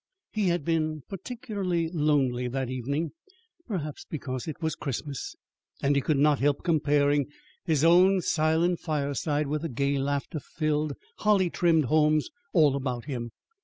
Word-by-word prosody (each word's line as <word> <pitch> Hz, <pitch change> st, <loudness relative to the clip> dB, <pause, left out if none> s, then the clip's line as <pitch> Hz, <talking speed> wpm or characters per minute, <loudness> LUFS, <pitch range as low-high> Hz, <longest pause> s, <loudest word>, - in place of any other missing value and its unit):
He 210 Hz, -3 st, 0 dB
had 170 Hz, -4 st, 0 dB
been 155 Hz, -3 st, 0 dB
particularly 195 Hz, -4 st, -3 dB
lonely 145 Hz, -6 st, +1 dB
that 130 Hz, 0 st, -2 dB
evening, 140 Hz, +6 st, -2 dB, 0.6 s
perhaps 155 Hz, -, -4 dB
because 130 Hz, -4 st, -4 dB
it 155 Hz, -, -5 dB
was 160 Hz, -2 st, -1 dB
Christmas, 140 Hz, -1 st, -5 dB, 0.4 s
and 140 Hz, +1 st, +2 dB
he 140 Hz, -, +3 dB
could 150 Hz, +1 st, +1 dB
not 145 Hz, 0 st, +4 dB
help 145 Hz, +1 st, +1 dB
comparing 145 Hz, -3 st, +2 dB, 0.4 s
his 155 Hz, -4 st, +2 dB
own 180 Hz, +3 st, +6 dB
silent 160 Hz, +2 st, +2 dB
fireside 145 Hz, -1 st, -1 dB
with 150 Hz, +1 st, -2 dB
the 165 Hz, -, -3 dB
gay, 140 Hz, +3 st, 0 dB
laughter 140 Hz, +2 st, -2 dB
filled, 155 Hz, 0 st, -1 dB, 0.2 s
holly 200 Hz, -4 st, +3 dB
trimmed 165 Hz, -4 st, +3 dB
homes 155 Hz, -, +2 dB, 0.2 s
all 150 Hz, -6 st, +4 dB
about 130 Hz, -3 st, -3 dB
him. 120 Hz, -5 st, -4 dB
150 Hz, 145 wpm, -27 LUFS, 140-165 Hz, 0.6 s, own